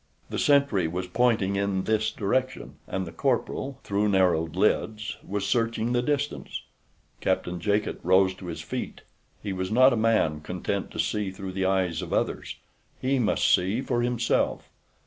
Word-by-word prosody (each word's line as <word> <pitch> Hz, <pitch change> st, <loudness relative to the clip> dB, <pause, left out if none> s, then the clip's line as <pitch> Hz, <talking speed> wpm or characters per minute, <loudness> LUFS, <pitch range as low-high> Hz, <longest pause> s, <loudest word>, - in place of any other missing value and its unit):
The -, -, -2 dB
sentry 140 Hz, -, +3 dB
was 90 Hz, +3 st, -3 dB
pointing 110 Hz, 0 st, +1 dB
in 100 Hz, -1 st, 0 dB
this 110 Hz, +1 st, +1 dB
direction, 130 Hz, +5 st, -2 dB
and 95 Hz, 0 st, -2 dB
the 85 Hz, -, -8 dB
corporal, 135 Hz, +9 st, -1 dB
through 105 Hz, +1 st, +1 dB
narrowed 90 Hz, -4 st, +2 dB
lids, 105 Hz, +2 st, 0 dB
was 100 Hz, 0 st, -3 dB
searching 115 Hz, 0 st, 0 dB
the 120 Hz, -, +2 dB
distance. 145 Hz, +2 st, -2 dB, 0.6 s
Captain 90 Hz, 0 st, -1 dB
Jacot 105 Hz, +4 st, 0 dB
rose 95 Hz, +1 st, +4 dB
to 90 Hz, -, -9 dB
his 85 Hz, -, -5 dB
feet. -, -, -5 dB, 0.4 s
He 100 Hz, -2 st, -3 dB
was 95 Hz, 0 st, -3 dB
not 130 Hz, +3 st, +6 dB
a -, -, +2 dB
man 110 Hz, -9 st, +2 dB
content 90 Hz, +4 st, -3 dB
to -, -, -8 dB
see 105 Hz, -2 st, 0 dB
through 95 Hz, 0 st, -6 dB
the 95 Hz, 0 st, 0 dB
eyes 95 Hz, -3 st, +1 dB
of -, -, -5 dB
others. -, -, -1 dB, 0.4 s
He 135 Hz, +1 st, +1 dB
must 110 Hz, -4 st, +3 dB
see 95 Hz, +6 st, +2 dB
for 120 Hz, -3 st, 0 dB
himself. 120 Hz, -1 st, 0 dB
100 Hz, 165 wpm, -26 LUFS, 95-120 Hz, 0.6 s, not